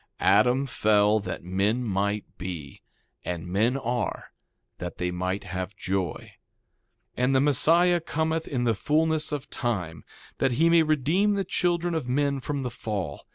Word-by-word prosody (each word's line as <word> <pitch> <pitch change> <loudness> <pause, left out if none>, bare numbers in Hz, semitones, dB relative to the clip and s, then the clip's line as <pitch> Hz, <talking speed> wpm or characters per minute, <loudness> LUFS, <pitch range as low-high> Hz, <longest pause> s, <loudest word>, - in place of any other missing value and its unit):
2:25 - - +3
Adam 130 +3 +4
fell 105 -3 +3
that 90 -4 -6
men 100 +7 0
might 100 -1 -1
be; 85 -6 -7 0.4
and 85 -2 -4
men 110 +9 +1
are, 120 -2 -3 0.5
that 90 - -6
they 90 0 -1
might 90 +2 -2
have 95 +2 -5
joy. 95 -3 -1 1.0
2:26 - - -35
And 125 +2 +2
the - - +5
Messiah 170 +5 +4
cometh 160 0 -2
in 125 -3 -1
the 115 -2 +2
fulness 155 +7 +1
of 145 -2 -4
time, 90 - -3 0.4
that 135 -2 +2
he 165 +6 +3
may 170 -1 +6
redeem 160 +7 +2
the 195 - 0
children 175 0 0
of 155 -7 -2
men 140 +1 +1
from 140 +1 -3
the 125 - -3
fall. 100 -10 -5
125 Hz, 160 wpm, -26 LUFS, 95-150 Hz, 1.0 s, may